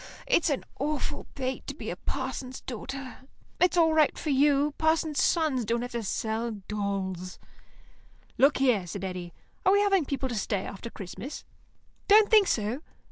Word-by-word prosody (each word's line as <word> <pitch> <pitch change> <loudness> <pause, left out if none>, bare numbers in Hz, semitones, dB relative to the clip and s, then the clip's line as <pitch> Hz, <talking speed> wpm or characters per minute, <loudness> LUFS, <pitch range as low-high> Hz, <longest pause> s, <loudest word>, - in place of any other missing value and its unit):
It's - - +3
an 280 - -1 0.2
awful 290 +1 -2
fate 260 -1 -3
to - - -4
be - - -5
a - - -4
parson's 260 -1 -4
daughter. 260 +2 -6 0.4
It's 360 -1 +3
all 325 -2 +5
right 310 -2 +3
for 305 - -2
you; 285 +1 +3
parsons' 315 -1 +2
sons 310 -7 +2
don't 235 +2 -1
have 245 - -5
to 235 - -2
sell 220 +2 -2
dolls." 195 -3 -3 1.0
"Look 275 +2 +5
here," 245 -9 +2
said 195 +2 -6
Eddy, 180 -2 -5 0.3
"are 380 - +5
we 405 - +5
having 395 -5 +3
people 270 -1 -2
to - - -3
stay 205 -1 -1
after 205 +4 -7
Christmas?" 225 +7 -8 0.6
"Don't 425 +1 +6
think 425 -3 +7
so. 220 +5 0
265 Hz, 165 wpm, -28 LUFS, 215-310 Hz, 1.0 s, think